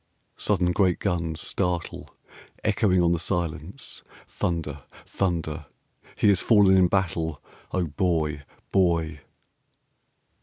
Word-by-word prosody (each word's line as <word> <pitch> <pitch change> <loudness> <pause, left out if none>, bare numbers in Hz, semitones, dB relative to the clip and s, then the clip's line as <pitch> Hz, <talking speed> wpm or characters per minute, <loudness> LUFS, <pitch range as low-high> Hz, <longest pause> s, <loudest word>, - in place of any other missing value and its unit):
Sudden 90 -4 +1
great 90 -1 +2
guns 85 -4 -2
startle, 90 -3 -2 0.5
echoing 100 -4 +3
on 85 - +3
the 85 - +1
silence. 85 - -3 0.3
Thunder. 80 -5 -3 0.2
Thunder. 80 -5 -2 0.5
HE 105 - +3
HAS 95 -3 +4
FALLEN 100 -4 +5
IN 95 -1 +5
BATTLE. 85 -4 -1 0.3
(O 95 - 0
Boy! 75 -2 0 0.3
Boy!) 85 -5 +2
85 Hz, 105 wpm, -25 LUFS, 80-95 Hz, 0.5 s, FALLEN